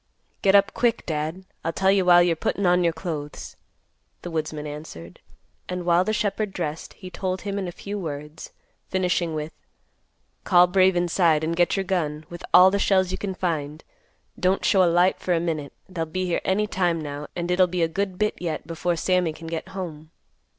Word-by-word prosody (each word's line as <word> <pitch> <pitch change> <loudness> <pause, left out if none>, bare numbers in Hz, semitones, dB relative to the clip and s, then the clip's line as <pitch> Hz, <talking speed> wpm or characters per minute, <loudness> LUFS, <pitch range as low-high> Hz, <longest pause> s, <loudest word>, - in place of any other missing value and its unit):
"Get 195 0 +4
up 200 +2 +4
quick, 240 -1 +1
Dad; 160 +4 -3 0.2
I'll 165 - -1
tell 190 +4 +2
you 195 -2 +2
while 175 -1 +7
you're 175 -1 +2
puttin' 195 +4 -1
on 180 0 +4
your 170 - +3
clothes," 160 -3 -6 0.7
the 175 - -6
woodsman 155 -1 -3
answered; 150 - -9 0.5
and 180 -1 -4
while 175 +1 +4
the 215 - -1
shepherd 210 -1 -1
dressed, 160 -2 -4
he 185 - -11
told 185 -1 -3
him 200 -1 -3
in 190 - -3
a - - -4
few 205 +4 -6
words, 150 -2 -7 0.4
finishing 180 -3 0
with, 155 +1 -4 0.9
"Call 180 -1 +6
Brave 185 +1 +3
inside, 170 -3 +2
and 165 +1 -1
get 175 +3 +2
your 195 - 0
gun, 160 -5 -2
with 175 - -8
all 185 +1 +8
the 200 - 0
shells 190 -2 +2
you 185 - -4
can 195 -2 -4
find. 155 -4 -3 0.6
Don't 185 +1 +1
show 190 -2 +5
a 175 - +4
light 175 +2 +3
for 180 - 0
a - - +1
minute. 155 -4 -3 0.2
They'll 165 -3 -4
be 185 +3 -2
here 175 - -1
any 200 +3 +1
time 175 -5 0
now, 145 -1 -6
and 175 0 -2
it'll 180 0 +4
be 175 -1 -1
a - - +3
good 190 +2 -3
bit 210 +1 +1
yet 165 -4 -3
before 170 +2 -1
Sammy 180 -1 +1
can 165 - -11
get 165 0 -4
home." 160 -5 -7
175 Hz, 200 wpm, -24 LUFS, 160-190 Hz, 0.9 s, all